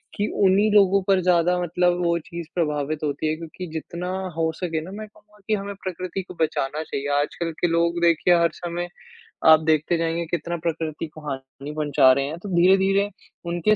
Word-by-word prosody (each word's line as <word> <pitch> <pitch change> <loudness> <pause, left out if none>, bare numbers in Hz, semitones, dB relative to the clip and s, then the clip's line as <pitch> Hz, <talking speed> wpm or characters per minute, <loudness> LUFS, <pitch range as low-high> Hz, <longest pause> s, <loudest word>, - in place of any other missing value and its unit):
कि 205 0 0 0.2
उन्हीं 200 +3 +4
लोगों 200 -1 +5
पर 195 -1 +4
ज़्यादा 180 0 +3
मतलब 175 +1 +1
वो 170 0 +2
चीज़ 170 -2 -7
प्रभावित 150 -3 -1
होती 145 +1 -1
है 155 - 0
क्योंकि 165 +3 -8
जितना 170 +3 -5 0.3
हो 160 0 +1
सके 165 -3 -2
ना, 180 - -9
मैं 215 +2 -7
कहूँगा 210 0 -24
कि 215 - +1
हमें 200 0 -5
प्रकृति 185 0 -4
को 180 - -11
बचाना 155 -1 -1
चाहिए। 140 -2 -4
आजकल 165 +3 -3
के 175 - +4
लोग 170 +1 +1
देखिए 170 +1 +4
हर 170 - +3
समय 175 0 -4 0.7
आप 155 - +6
देखते 155 +2 +1
जाएँगे 165 +1 -1
कितना 170 +1 -2
प्रकृति 160 -1 -3
को 155 0 -13
हानि 135 +2 -7
पहुँचा 145 -3 +4
रहे 135 +1 0
हैं, 155 +4 -5
तो 200 - -8
धीरे-धीरे 195 +3 +4 0.4
उनके 175 +5 +2
170 Hz, 190 wpm, -23 LUFS, 155-185 Hz, 0.7 s, आप